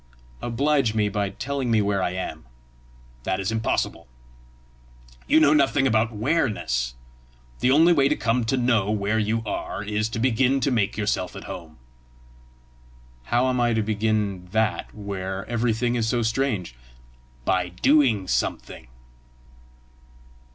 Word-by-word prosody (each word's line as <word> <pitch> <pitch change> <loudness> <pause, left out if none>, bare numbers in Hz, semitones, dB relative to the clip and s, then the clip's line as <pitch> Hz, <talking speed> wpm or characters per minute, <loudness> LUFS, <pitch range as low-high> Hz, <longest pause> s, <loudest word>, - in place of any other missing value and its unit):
"Oblige 125 -1 +1
me 105 -1 +2
by 100 -1 -1
telling 135 +5 -3
me 115 -1 +3
where 100 -1 +1
I 90 - 0
am." 90 -8 -5 0.8
"That 95 +9 -2
is 95 +2 -2
impossible. 110 - -1 1.2
You - - +5
know 150 -1 +5
nothing 140 -2 +3
about 110 -2 +2
whereness. 105 - -1 0.6
The 125 - +2
only 160 +6 +6
way 140 -3 +3
to 150 - +2
come 120 -1 0
to 120 +4 0
know 115 -5 +2
where 105 +1 0
you 110 +1 0
are 100 -1 -4
is 105 +1 -1
to 115 - -5
begin 130 +3 +2
to 135 - +1
make 105 -5 0
yourself 100 -4 -1
at - - -8
home." 85 -5 -9 1.5
"How 120 - +2
am 125 -1 +1
I 120 -1 +2
to 110 - +1
begin 105 -3 -1
that 110 +3 -1
where 100 -2 -5
everything 120 0 0
is 115 -2 0
so 120 0 +1
strange?" 110 - -1 0.7
"By 90 -1 +1
doing 115 - +2
something." - - -2
110 Hz, 140 wpm, -24 LUFS, 100-125 Hz, 1.5 s, only